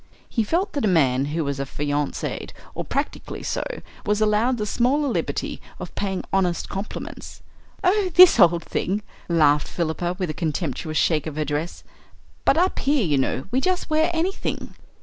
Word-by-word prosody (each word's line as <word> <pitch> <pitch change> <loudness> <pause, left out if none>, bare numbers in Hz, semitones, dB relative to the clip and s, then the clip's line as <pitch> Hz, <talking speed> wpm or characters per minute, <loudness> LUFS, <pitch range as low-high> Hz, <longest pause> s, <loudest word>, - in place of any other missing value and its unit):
He 230 - 0
felt 355 - 0
that 285 - -1
a - - +3
man 135 -7 +3
who 155 +3 -1
was 140 -1 -2
affianced, 145 +1 -3 0.2
or - - -3
practically - - -3
so, - - -1 0.4
was 210 0 +1
allowed 215 +4 +2
the 210 - -2
smaller 260 +7 +1
liberty 250 - -2 0.2
of - - -8
paying 190 -2 -2
honest 180 -3 +1
compliments. 195 +2 -7 0.4
"Oh, 385 +1 +3
this 360 -8 +9
old 170 -2 +5
thing," 200 +3 -2 0.3
laughed 150 -3 +4
Philippa, 175 +1 -2
with 180 -5 -2
a - - -6
contemptuous 155 -1 -2
shake 155 -2 +2
of 155 - -5
her 155 0 -1
dress. 150 +4 -3 0.6
"But - - +4
up 365 +3 +2
here, 275 -5 +2
you 145 -4 +2
know, 130 0 -1
we 260 +2 +1
just 365 -2 -1
wear 315 +2 +3
anything." 345 +3 -2
190 Hz, 170 wpm, -23 LUFS, -, 0.6 s, this